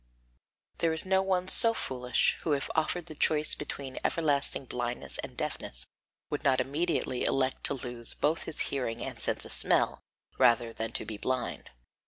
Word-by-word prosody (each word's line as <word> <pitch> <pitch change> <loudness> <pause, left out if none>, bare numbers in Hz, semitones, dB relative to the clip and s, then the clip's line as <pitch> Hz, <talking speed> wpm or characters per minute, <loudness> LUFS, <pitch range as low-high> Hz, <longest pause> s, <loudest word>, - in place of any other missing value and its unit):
There 165 -1 +1
is 160 - +6
no 190 0 +2
one 185 -1 -1
so 230 +4 +5
foolish 125 - 0
who 155 - 0
if 140 - -2
offered 160 +2 -1
the 160 - -10
choice 150 0 +6
between 135 -2 -5
everlasting 145 -4 +1
blindness 120 -1 -2
and - - -7
deafness - - -4 0.5
would 145 - -3
not 135 -3 +3
immediately 140 -1 -1
elect 130 -1 0
to - - 0
lose 120 -3 -6
both 155 +3 -1
his 160 - -1
hearing 125 -4 -3
and - - -6
sense - - +2
of - - 0
smell - - +2 0.4
rather 115 -1 +3
than 110 0 -5
to - - -2
be 110 - -6
blind. 130 +2 -3
140 Hz, 170 wpm, -29 LUFS, 125-160 Hz, 0.5 s, is